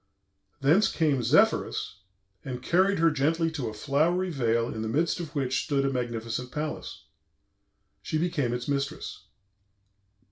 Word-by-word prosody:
Thence 165 +10 +5
came 150 -6 +1
Zephyrus, 155 - +2 0.5
and 125 -1 -6
carried 190 +5 +3
her 165 0 +4
gently 160 +3 +1
to 145 -6 -3
a - - -8
flowery 160 +9 +1
vale 115 -5 +1
in 110 - -4
the 110 - -2
midst 160 +10 0
of 160 -3 -7
which 135 -2 0
stood 140 -3 0
a 135 - +1
magnificent 120 0 -3
palace. 150 - -5 1.0
She 155 - -2
became 155 -7 0
its 120 0 -3
mistress. 140 -7 -3
140 Hz, 140 wpm, -27 LUFS, 125-165 Hz, 1.0 s, Thence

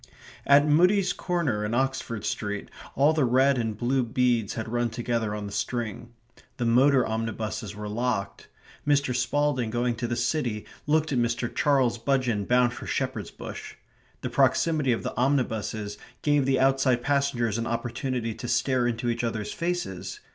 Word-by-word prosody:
At 140 +1 +6
Mudie's 180 +5 +4
corner 155 - -1
in 105 +2 -1
Oxford 130 -4 -1
Street 105 -1 -3 0.3
all 145 +4 +4
the 155 -2 +2
red 130 +2 +3
and 110 -3 -2
blue 130 +3 +1
beads 120 -3 +1
had 110 - -4
run 120 +1 0
together 115 -2 -2
on 105 -1 -5
the 100 - -6
string. 115 +2 -3 0.5
The 120 - -1
motor 130 +3 +4
omnibuses 110 -1 -3
were 105 0 -6
locked. 115 -1 -2 0.4
Mr. 140 -3 +2
Spalding 145 -3 +1
going 120 +2 0
to 120 - -2
the 120 - -1
city 120 -5 -1 0.2
looked 155 +1 +2
at 130 - +1
Mr. 120 0 -1
Charles 130 -5 +2
Budgeon 120 -5 0
bound 125 -1 +3
for - - -8
Shepherd's - - -2
Bush. - - -8 0.5
The - - -4
proximity 155 -6 +2
of 115 - -1
the - - -4
omnibuses 110 -5 -1 0.2
gave 145 -2 +2
the 135 -1 +2
outside 135 -2 +3
passengers 135 -6 +1
an 115 - -2
opportunity 120 0 -2
to 120 - -7
stare 125 +1 +1
into 120 0 -2
each 120 0 -1
other's 110 -3 -2
faces. 170 - -3
120 Hz, 160 wpm, -26 LUFS, 115-135 Hz, 0.5 s, At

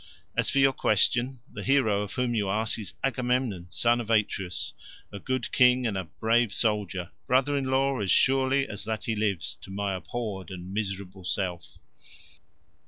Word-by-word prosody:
As - - +1
for - - -1
your 135 0 +5
question, 120 +4 +2
the - - -8
hero 125 -7 +2
of 105 - -5
whom 125 -2 0
you 105 -4 0
ask 110 +3 0
is 100 -2 -7
Agamemnon, 125 -8 0
son 120 +4 +2
of 115 - -8
Atreus, 100 -4 0 0.4
a 100 - -7
good 130 +4 -2
king 125 0 +5
and 110 -4 0
a 95 -1 -2
brave 110 +6 +1
soldier, 100 -5 0 0.2
brother 130 +3 +3
in 140 -1 0
law 135 0 +1
as 100 -2 -2
surely 135 +2 +3
as 105 - -5
that 110 -3 -3
he 110 - -1
lives, 95 -8 -1
to - - -13
my 100 0 -2
abhorred 100 0 -5
and 95 0 -8
miserable 95 -2 -4
self." 90 -1 -3
110 Hz, 170 wpm, -27 LUFS, 95-125 Hz, 0.4 s, your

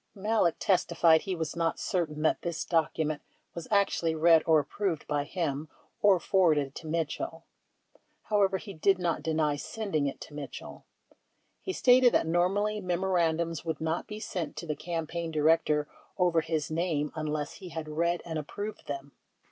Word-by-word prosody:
Malek 210 -3 +1
testified 170 -3 +3
he 190 -2 -3
was 160 -3 -3
not 165 -1 0
certain 155 -4 -2
that 155 - +2
this 170 -2 -3
document 155 -2 0 0.3
was 170 -1 -7
actually 195 -5 +2
read 165 0 +6
or 160 -1 +6
approved 165 +3 -2
by 145 -1 0
him 155 -3 -3 0.3
or 200 -3 +5
forwarded 155 -8 +2
to 160 - -8
Mitchell; 165 0 -3 0.8
however, 200 -2 +2
he 200 0 -9
did 195 +3 +3
not 175 -2 -1
deny 155 -2 +1
sending 160 -2 -2
it 140 - -5
to - - -10
Mitchell. 145 -2 -8 0.8
He 380 - -3
stated 250 -7 +5
that - - +3
normally 195 +6 +1
memoran 175 -3 +1
dums 165 -2 -3
would 160 -2 -3
not 160 +1 -2
be 210 0 -6
sent 180 -7 -4
to - - -6
the 155 -2 -2
campaign 165 0 -4
director 155 -1 +2 0.3
over 175 -3 +3
his 160 -1 -2
name 155 -3 0
unless 155 -2 -3
he 185 - -9
had 160 -2 -5
read 170 +3 0
and 160 -2 -3
approved 205 +8 -6
them. 140 0 -5
165 Hz, 165 wpm, -29 LUFS, 155-185 Hz, 0.8 s, read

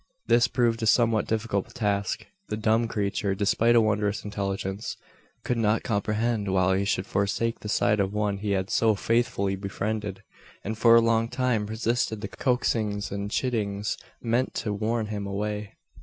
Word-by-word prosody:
This 120 +1 +4
proved 120 -2 +1
a 110 - 0
somewhat 115 -2 +3
difficult 110 -3 -2
task. 100 -4 -1 0.2
The 105 - -3
dumb 110 +2 +2
creature, 100 -2 -1
despite 110 +4 +3
a 115 - +7
wondrous 105 -1 0
intelligence, 100 0 -3 0.5
could 125 -2 -1
not 110 0 +2
comprehend 105 -1 0
why 95 0 +3
he 100 - 0
should 95 -1 0
forsake 100 +4 -1
the 105 - -7
side 105 0 +2
of 100 -1 +1
one 105 -1 -1
he 105 +1 -3
had 95 0 -1
so 110 -2 +3
faithfully 115 -3 0
befriended; 100 0 -4 0.4
and 110 +2 -3
for 115 +1 +6
a 115 - +7
long 115 0 +2
time 120 -4 0
resisted 110 0 -1
the 105 - -3
coaxings 105 -3 -1
and 100 +1 -3
chidings, 105 -4 -1 0.2
meant 120 +2 0
to 105 - -2
warn 110 +2 -1
him 105 -2 -4
away. 105 +1 -3
105 Hz, 165 wpm, -26 LUFS, 100-115 Hz, 0.5 s, a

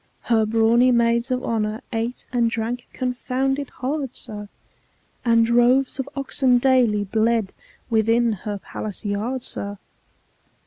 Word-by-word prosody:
Her 220 -2 +2
brawny 230 +3 +4
maids 235 0 +2
of 255 0 -1
honour 215 -1 -1
ate 230 +2 -3
and 235 -2 +2
drank 230 +2 -3
confounded 260 +2 -2
hard, 270 0 -4
sir, 210 -3 -7 0.7
And 230 -1 +4
droves 245 +3 +3
of 270 +1 -3
oxen 270 -2 +2
daily 245 -5 +3
bled 220 0 0 0.4
within 225 +1 +3
her 205 +1 -5
palace 210 +2 -7
yard, 220 +6 -2
sir! 200 -5 -3
235 Hz, 125 wpm, -22 LUFS, 220-255 Hz, 0.7 s, brawny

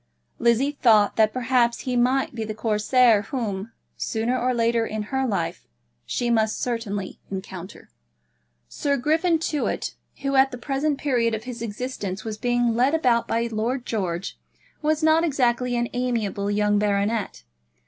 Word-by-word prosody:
Lizzie 235 +4 +3
thought 220 -7 +4
that 215 -1 +4
perhaps 245 -1 +1
he 255 -1 -2
might 255 +3 +2
be 225 -2 -3
the 215 0 -5
Corsair 220 +1 +3
whom, 220 -4 -3 0.2
sooner 230 +3 -1
or 255 0 +1
later 230 -1 +2
in 215 -1 -3
her 265 0 +1
life, 170 -6 -3 0.4
she 240 -1 -1
must 220 -1 +1
certainly 215 -5 -3
encounter. 190 -1 -8 0.8
Sir 280 - -1
Griffin 320 +6 +2
Tewett, 310 -2 -2 0.3
who 275 0 0
at 265 0 +5
the 250 - -7
present 275 +3 -1
period 240 -6 +1
of 220 - -6
his 245 -1 -7
existence 215 -3 -4
was 215 -1 -5
being 245 -1 +1
led 255 +6 +3
about 245 -7 +2
by 230 +1 0
Lord 235 +4 -2
George, 185 -5 -3 0.4
was 310 +1 +1
not 315 +1 +4
exactly 250 -5 +1
an 240 0 0
amiable 230 -5 -1
young 205 0 +2
baronet. 205 - -1
235 Hz, 150 wpm, -24 LUFS, 215-255 Hz, 0.8 s, at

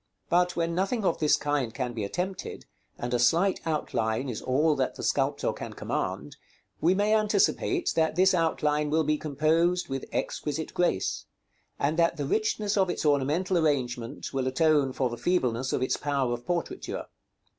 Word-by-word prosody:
But 180 +1 +2
when 170 0 0
nothing 195 +5 0
of 170 - +1
this 150 -2 +4
kind 145 -5 -1
can 125 0 -3
be 110 -3 -3
attempted, 180 - -4 0.3
and 120 +1 -4
a 120 - +2
slight 170 +11 +3
outline 125 -5 -1
is 115 - -4
all 150 +4 +2
that 130 - -1
the - - -7
sculptor - - 0
can - - -7
command, 75 +3 -4 0.4
we 175 - +3
may 205 +2 +2
anticipate 215 - +2
that 160 -1 +2
this 190 +2 +4
outline 150 -3 +1
will 160 +2 +2
be 150 0 0
composed 160 +4 +1
with 135 0 -3
exquisite 155 +1 -3
grace; 175 - 0 0.5
and 155 +4 0
that 170 0 +3
the 145 - -2
richness 215 +4 0
of 190 -2 +3
its 175 - -2
ornamental 150 +6 +2
arrangement 125 -7 -1
will 135 -1 -1
atone 145 0 +3
for 130 0 0
the 120 0 -5
feebleness 130 -4 0
of - - 0
its 130 - 0
power 140 -4 0
of 120 0 -7
portraiture. 175 - -3
155 Hz, 170 wpm, -27 LUFS, 130-180 Hz, 0.5 s, this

